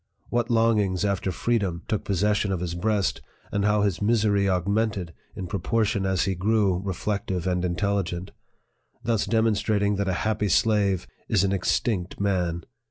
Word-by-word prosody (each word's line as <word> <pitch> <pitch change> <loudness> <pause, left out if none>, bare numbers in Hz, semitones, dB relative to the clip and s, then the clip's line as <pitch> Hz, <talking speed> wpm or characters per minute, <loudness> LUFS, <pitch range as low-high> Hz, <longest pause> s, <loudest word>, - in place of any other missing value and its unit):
what 120 -1 0
longings 105 -5 +2
after 100 -1 0
freedom 95 -4 -1
took 110 - -1
possession 105 +1 +1
of 95 - -1
his 85 -1 -3
breast, 100 +2 0 0.3
and 100 - 0
how 105 0 +3
his 95 -6 0
misery 105 -2 +2
augmented, 95 -1 0 0.2
in 95 - -5
proportion 100 +2 0
as 95 -1 +1
he 95 - 0
grew 95 0 +1
reflective 95 -1 -3
and 90 -1 0
intelligent, 90 0 -1 0.7
thus 115 -2 0
demonstrating 105 -2 +1
that 100 -1 0
a - - +1
happy 105 -1 0
slave 100 - +2 0.2
is - - +3
an 95 - +1
extinct 95 0 -1
man 90 -4 0
100 Hz, 150 wpm, -25 LUFS, 90-105 Hz, 0.7 s, how